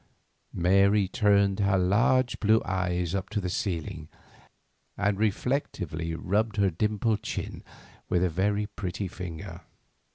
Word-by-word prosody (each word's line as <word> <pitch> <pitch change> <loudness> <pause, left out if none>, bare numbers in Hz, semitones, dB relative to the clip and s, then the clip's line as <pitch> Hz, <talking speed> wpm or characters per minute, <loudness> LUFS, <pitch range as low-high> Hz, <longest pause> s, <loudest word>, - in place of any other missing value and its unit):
Mary 100 +3 +4
turned 100 -1 +2
her 100 -1 +3
large 115 +7 +2
blue 110 +1 +4
eyes 90 -2 -1
up 95 0 -2
to - - -1
the 90 -2 -3
ceiling, 85 -4 -3 0.9
and 100 -1 0
reflectively 95 - -1
rubbed 105 +5 0
her 100 -2 +3
dimpled 105 +4 0
chin - - -5 0.5
with 90 0 +2
a - - +3
very 100 +5 0
pretty 100 -2 -4
finger. 85 -3 -7
100 Hz, 125 wpm, -27 LUFS, 90-105 Hz, 0.9 s, Mary